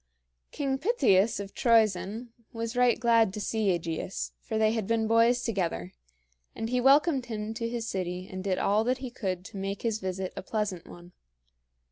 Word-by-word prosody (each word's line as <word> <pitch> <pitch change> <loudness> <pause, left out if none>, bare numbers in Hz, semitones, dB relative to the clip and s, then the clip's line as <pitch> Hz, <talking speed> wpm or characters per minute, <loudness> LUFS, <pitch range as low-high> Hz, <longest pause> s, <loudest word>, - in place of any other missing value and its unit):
King 270 -2 -2
Pittheus 235 - +3
of 200 -1 -7
Troezen 220 -1 +2 0.2
was 230 0 -4
right 245 -2 +3
glad 230 -3 +4
to - - -4
see 220 0 -1
AEgeus, 170 0 -2
for 220 - -4
they 215 0 +3
had 220 -3 -2
been 230 -1 +1
boys 230 +2 +3
together, 170 - -2 0.6
and 225 +1 -4
he 250 0 +1
welcomed 275 0 +4
him 215 -1 -4
to 230 0 -3
his 230 -1 -4
city 185 -2 -3
and 185 -1 -6
did 190 -2 0
all 210 +2 +2
that 250 +1 +1
he 260 -2 -7
could 185 -6 -4
to 205 - -9
make 195 +1 -4
his 225 -2 0
visit 190 -1 -4
a - - -5
pleasant 200 -4 -3
one. 175 0 -13
220 Hz, 180 wpm, -28 LUFS, 190-235 Hz, 0.6 s, glad